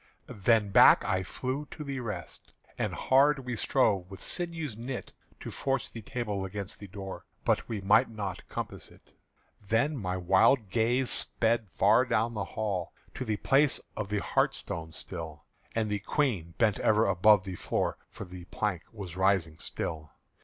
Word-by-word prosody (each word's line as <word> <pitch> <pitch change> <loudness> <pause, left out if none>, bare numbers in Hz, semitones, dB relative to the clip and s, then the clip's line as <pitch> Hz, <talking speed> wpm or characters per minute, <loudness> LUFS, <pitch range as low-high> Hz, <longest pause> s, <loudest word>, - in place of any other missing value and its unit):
Then 105 0 +2
back - - +7
I 95 - +1
flew 130 +9 -4
to 155 - -7
the 140 -2 -4
rest; 105 -9 -7 0.2
and - - -1
hard 135 0 +3
We 125 -1 -3
strove 100 -6 +1
with 95 - -10
sinews 165 - -3
knit 125 +3 -6 0.3
To - - -6
force 135 -2 -1
the 115 - -8
table 105 -2 -3
against 100 0 -5
the 100 - -9
door 95 0 -7 0.2
But - - +1
we 110 -3 -3
might 105 +6 +4
not 100 -5 -6
compass - - -5
it. - - -21 0.5
Then 115 +9 +1
my 95 -7 -2
wild 95 +4 +3
gaze 120 +3 +2
sped 115 -2 +2
far 105 +6 +4
down 115 +1 +1
the 105 -2 -2
hall 100 -6 -3 0.2
To - - -4
the 110 -4 -1
place 140 +5 +3 0.2
of 100 - -4
the 105 -1 -1
hearthstone 80 -1 -1
sill; 80 -3 -7 0.3
And 110 -1 +1
the 105 -1 -1
Queen 100 - -1
bent 110 -4 +2
ever 110 +1 +3
above 100 +1 +5
the 95 -2 -6
floor, - - -2
For 105 - -8
the 90 -1 -10
plank 95 -3 -2
was 95 -6 -7
rising 95 -4 +1
still. 80 -2 -4
105 Hz, 165 wpm, -29 LUFS, 95-120 Hz, 0.5 s, back